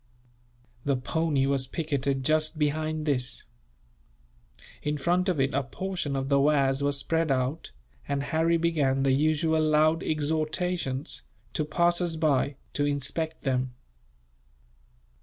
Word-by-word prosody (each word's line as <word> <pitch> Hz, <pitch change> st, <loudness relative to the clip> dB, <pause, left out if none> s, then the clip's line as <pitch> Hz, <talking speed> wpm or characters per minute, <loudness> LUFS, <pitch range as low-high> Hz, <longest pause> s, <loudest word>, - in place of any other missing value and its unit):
The 140 Hz, -1 st, +1 dB
pony 145 Hz, +1 st, 0 dB
was 135 Hz, -1 st, +1 dB
picketed 140 Hz, -3 st, -2 dB
just 155 Hz, +1 st, +2 dB
behind 155 Hz, +1 st, -1 dB
this. 130 Hz, -4 st, 0 dB, 1.4 s
In 150 Hz, 0 st, -1 dB
front 175 Hz, +6 st, +1 dB
of 175 Hz, -6 st, 0 dB
it 135 Hz, +1 st, +1 dB
a 140 Hz, -, +2 dB
portion 145 Hz, +2 st, -4 dB
of 135 Hz, 0 st, -2 dB
the 140 Hz, 0 st, +3 dB
wares 140 Hz, -1 st, +3 dB
was 140 Hz, 0 st, +1 dB
spread 165 Hz, +2 st, 0 dB
out, 135 Hz, +4 st, -1 dB, 0.4 s
and 140 Hz, -1 st, -1 dB
Harry 165 Hz, +3 st, +2 dB
began 145 Hz, -5 st, +1 dB
the 135 Hz, -, +3 dB
usual 155 Hz, +3 st, +2 dB
loud 155 Hz, +1 st, +3 dB
exhortations, 155 Hz, -1 st, -1 dB, 0.3 s
to 155 Hz, -, 0 dB
passers 175 Hz, +1 st, +1 dB
by, 145 Hz, -3 st, +1 dB, 0.2 s
to 145 Hz, -, 0 dB
inspect 145 Hz, +3 st, -2 dB
them. 130 Hz, -2 st, -1 dB
150 Hz, 125 wpm, -27 LUFS, 135-160 Hz, 1.4 s, the